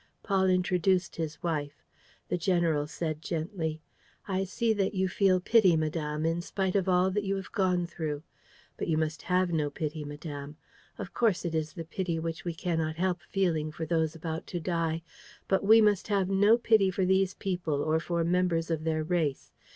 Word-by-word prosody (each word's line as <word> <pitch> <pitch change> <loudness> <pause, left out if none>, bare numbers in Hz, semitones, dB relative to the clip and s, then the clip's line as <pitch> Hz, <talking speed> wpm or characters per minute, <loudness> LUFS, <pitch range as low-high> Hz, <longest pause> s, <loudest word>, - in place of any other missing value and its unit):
Paul 190 -2 +2
introduced 185 0 +1
his 160 -2 -4
wife. 150 -4 -3 0.4
The - - -1
general 165 -4 +1
said, 155 -1 -4
gently: 160 -1 -3 0.4
"I 190 -1 0
see 225 +4 0
that 200 -1 -1
you 190 0 +1
feel 185 0 +3
pity, 190 -2 +4
madame, 155 -1 -2
in 165 +1 0
spite 190 +1 -2
of 190 -1 +2
all 180 +1 +3
that 205 +2 -1
you 195 0 -1
have 195 0 -6
gone 180 -3 +1
through. 155 -3 -4 0.5
But - - -3
you 160 -2 +1
must 155 -1 -1
have 180 0 +1
no 150 -3 0
pity, 155 +1 -4
madame. 145 0 -7 0.4
Of - - -7
course 215 -7 +1
it 170 - -2
is 155 -1 -1
the 165 -3 -6
pity 170 0 -2
which 165 0 -4
we 170 -2 -3
cannot 160 -2 -1
help 180 0 0
feeling 165 -6 0
for 160 +1 -5
those 160 -1 0
about 160 0 -5
to 175 - -3
die. 165 -1 -1 0.4
But 195 - +2
we 220 +2 +8
must 210 -3 +3
have 200 -3 +1
no 205 +4 +5
pity 220 -5 +4
for 190 0 0
these 190 0 +2
people 175 -7 -2
or 160 +1 +2
for 170 0 -1
members 170 -1 +1
of 160 -1 -2
their 155 -1 0
race. 155 -4 -1
170 Hz, 190 wpm, -29 LUFS, 160-190 Hz, 0.5 s, we